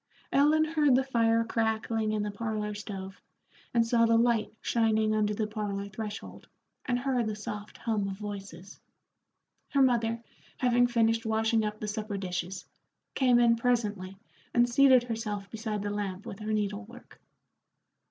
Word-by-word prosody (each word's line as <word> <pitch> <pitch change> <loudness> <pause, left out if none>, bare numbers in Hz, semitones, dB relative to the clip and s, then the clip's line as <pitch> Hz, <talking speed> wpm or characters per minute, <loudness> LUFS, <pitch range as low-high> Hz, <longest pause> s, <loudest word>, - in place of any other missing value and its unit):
Ellen 300 +3 +4
heard 305 -4 +3
the 265 - +3
fire 230 -3 +2
crackling 220 -1 -1
in 215 -1 0
the 210 - -3
parlor 210 0 -3
stove, 195 -2 -7 0.5
and 230 -1 +3
saw 230 0 +3
the 230 0 +4
light 230 -2 +2
shining 220 -2 +1
under 210 -1 +1
the 215 - -1
parlor 205 -2 -4
threshold, 215 0 -7 0.4
and 245 -2 +1
heard 250 -2 0
the 215 - -2
soft 210 0 -7
hum 215 -4 -1
of 195 -1 -5
voices. 195 -3 -8 0.9
Her 280 - +2
mother, 230 -2 +1 0.3
having 245 -1 +3
finished 230 -1 +2
washing 220 0 +1
up 210 0 -3
the 215 - -4
supper 210 -1 -3
dishes, 180 -1 -4 0.5
came 250 -3 +4
in 235 -1 +4
presently 210 -6 -1 0.4
and 240 0 +5
seated 260 0 +5
herself 215 -4 -4
beside 215 -2 -3
the 205 - -2
lamp 200 -2 -4
with 195 - -7
her 215 0 -4
needle 210 0 -1
work. 245 +3 -15
220 Hz, 155 wpm, -29 LUFS, 205-235 Hz, 0.9 s, and